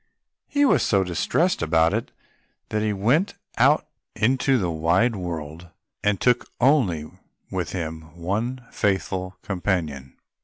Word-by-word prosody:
He 285 0 +2
was - - +4
so 100 -2 +3
distressed 95 - 0
about 80 0 +3
it, - - -2 0.6
that 105 - -1
he 110 0 +1
went 120 - +1 0.2
out - - +4 0.3
into 130 +3 +2
the 90 -6 -1
wide 85 +9 +2
world 85 -2 -6 0.3
and 105 -1 +2 0.4
only 125 - +3
took 75 - -14 0.3
with 90 -5 -2
him 80 -3 -4 0.2
one 115 +9 -2
faithful 95 -1 -1
companion. 85 -9 -2
95 Hz, 125 wpm, -24 LUFS, 85-115 Hz, 0.6 s, was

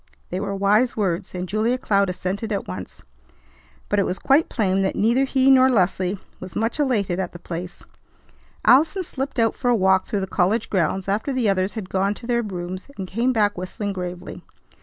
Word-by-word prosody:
They 180 - -2
were 200 0 -3
wise 210 +6 +2
words, 185 -2 -1
and 180 0 -3
Julia 220 +6 +1
Cloud 200 -5 +1
assented 190 +4 -3
at 200 -2 -2
once; 90 - -8 0.8
but 205 - +1
it 200 - +2
was 185 - -2
quite 280 +4 +3
plain 195 -4 +1
that 190 - 0
neither 235 +6 +3
he 265 0 +3
nor 260 0 +6
Leslie 190 -3 +1 0.2
was 185 -1 -9
much 225 +7 -1
elated 210 -10 +1
at 185 -2 -3
the - - -8
place. 175 +1 -7 0.8
Allison 320 +8 +5
slipped 270 -4 -5
out 225 -2 +3
for 245 - -1
a 240 - +4
walk 190 -2 +3
through 205 - -1
the - - -1
college 195 +4 0
grounds 190 0 0
after 210 +8 -1
the 255 -4 0
others 195 +1 0
had 215 -4 -5
gone 195 +2 0
to 235 - -11
their 235 0 +1
rooms, 185 -3 -6
and 190 - -5
came 235 +7 0
back 210 -4 +2
whistling 200 +2 -4
gravely. 180 0 -6
200 Hz, 200 wpm, -23 LUFS, 185-235 Hz, 0.8 s, nor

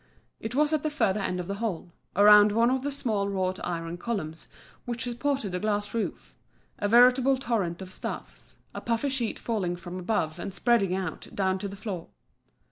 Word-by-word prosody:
It 225 +3 -5
was 300 +2 +3
at 310 - +2
the 310 - -1
further 225 -9 +1
end 180 -2 -2
of 175 - -4
the 200 - -2
hall, 180 -6 -3 0.2
around 210 +1 +8
one 230 +3 +4
of 260 0 +1
the 285 +2 -2
small 215 -8 0
wrought 185 -1 -1
iron 165 -1 -3
columns 175 -8 -4 0.4
which 240 -1 -2
supported 245 -2 -1
the 180 - -2
glass 205 0 -1
roof, 230 -2 -3 0.5
a 205 - +1
veritable 250 +4 +6
torrent 195 -9 -1
of 185 0 -9
stuffs, - - -6 0.2
a - - -6
puffy 235 +4 0
sheet 255 -4 -1
falling 195 -7 -1
from 175 +1 -7
above 175 -4 -1
and 195 +2 -5
spreading 210 -7 +2
out 185 -4 -4
down 190 -1 +1
to 200 - -3
the 195 - -7
floor. 195 -4 -5
205 Hz, 190 wpm, -27 LUFS, 185-240 Hz, 0.5 s, around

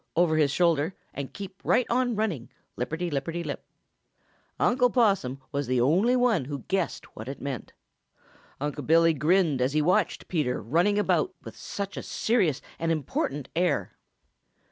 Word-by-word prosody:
over 165 -1 +3
his 150 -2 +3
shoulder 165 +2 +2 0.2
and 140 -2 -5
keep 195 -1 -9
right 250 - +3
on 245 -1 +1
running, 180 - -2 0.3
lip 125 - -3
perty 170 +2 -3
lipperty 165 +5 -2
lip. 145 - -5 1.0
Unc' 250 0 +3
Possum 195 - +2
was 140 -2 -2
the 130 0 +1
only 180 - +3
one 240 - +2
who 140 -1 -5
guessed 190 -3 -2
what 110 - -8
it 135 - -6
meant. 140 -3 -5 0.9
Unc' 145 -1 -4
Billy 165 +1 +5
grinned 155 -2 +2
as 130 +2 +1
he 155 - +3
watched 180 +4 +1
Peter 145 -8 0
running 175 - +2
about 185 -3 +1
with - - -9
such 200 -1 -5
a - - -2
serious 200 - 0 0.2
and 165 0 0
important 145 -2 -2
air. 175 +1 0
165 Hz, 160 wpm, -27 LUFS, 140-195 Hz, 1.0 s, Billy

